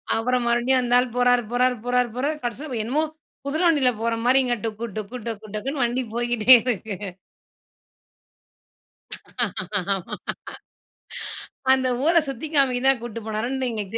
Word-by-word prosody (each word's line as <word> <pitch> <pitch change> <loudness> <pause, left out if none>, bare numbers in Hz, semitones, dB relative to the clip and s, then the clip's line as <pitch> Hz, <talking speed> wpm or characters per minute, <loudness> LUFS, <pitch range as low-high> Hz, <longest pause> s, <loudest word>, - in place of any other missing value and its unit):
அப்புறம் 245 +2 0
மறுபடியும் 240 +2 +3
அந்த 245 -1 -1
ஆள் 250 0 0
போறாரு, 245 0 +3
போறாரு, 250 +1 +2
போறாரு, 250 0 +2
போறாரு 285 +5 -1
கடைசில 245 +2 -4
என்னமோ 270 +8 0 0.4
குதிரை 310 +5 -1
வண்டில 285 -6 +4
போறமாரிங்க. 240 +3 +2
டொக்கு 225 +1 -4
டொக்கு 215 +4 -5
டொக்கு 215 -2 -6
டொக்குனு 270 +6 -3
வண்டி 240 +2 0
போயிட்டே 240 0 +4
இருக்கு. 220 -4 -2 3.0
ஆமா. 190 -3 -6 1.6
அந்த 260 -1 +2 0.2
ஊர 325 - +4 0.2
சுத்தி 275 +3 -5
காமிக்க 265 -4 +3
தான் 270 -3 +3
கூட்டிட்டு 230 -2 -6
போனாருன்னு 245 +4 -2
எங்களுக்கு 215 -2 -4
245 Hz, 125 wpm, -23 LUFS, 230-260 Hz, 3.0 s, வண்டில